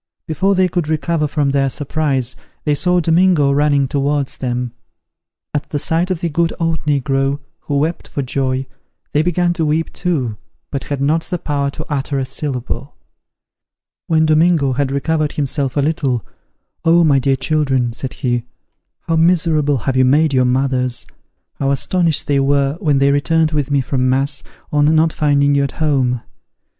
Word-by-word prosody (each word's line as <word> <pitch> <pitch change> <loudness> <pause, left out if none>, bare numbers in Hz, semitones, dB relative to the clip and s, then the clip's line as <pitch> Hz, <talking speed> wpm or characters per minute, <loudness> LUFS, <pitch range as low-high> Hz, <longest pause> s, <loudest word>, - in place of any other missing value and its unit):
Before 190 +5 +1
they 185 0 +3
could 175 -3 -2
recover 155 0 0
from 145 -1 0
their 135 -1 +1
surprise, 135 -3 -1 0.3
they 150 - +1
saw 180 +4 +2
Domingo 165 -3 +3
running 140 -1 +2
towards 140 0 -1
them. 125 -1 -2 0.8
At 145 - -3
the 150 - -2
sight 165 +4 +1
of 180 -3 -2
the 170 - -1
good 165 +2 +1
old 165 -2 -1
negro, 135 -1 +1 0.2
who 145 - -2
wept 160 +4 -1
for 140 - -3
joy, 130 0 -1 0.5
they 150 - +3
began 175 +1 +1
to 170 - -2
weep 160 +2 -1
too, 135 - -1 0.3
but 140 -1 -4
had 140 -2 -3
not 160 +3 +1
the 180 - -3
power 145 -3 -1
to 155 +2 -7
utter 140 -1 -2
a 135 - -1
syllable. 135 0 -4 1.1
When 160 -1 +3
Domingo 155 -3 +3
had 135 +1 -1
recovered 150 +2 0
himself 140 -1 -2
a - - +3
little, 140 -6 -1 0.6
"Oh, 170 +1 +5
my 145 -4 +4
dear 135 +1 +2
children," 135 -5 0
said 130 +2 -5
he, 120 -2 -1 0.6
"how 165 - -1
miserable 160 -4 +2
have 135 - 0
you 130 - +4
made 145 +3 +3
your 130 -1 +3
mothers! 125 -1 0 0.5
How 135 - 0
astonished 160 +2 +1
they 140 -1 +1
were 140 +1 +1
when 150 -7 +2
they 140 +1 +3
returned 155 +2 +2
with 150 -3 -1
me 140 -1 +2
from 130 0 0
mass, 135 +2 +1 0.3
on 150 +1 +3
not 160 0 +3
finding 145 -1 +2
you 140 0 +2
at 140 - -3
home. 130 -6 0
145 Hz, 170 wpm, -17 LUFS, 135-160 Hz, 1.1 s, Oh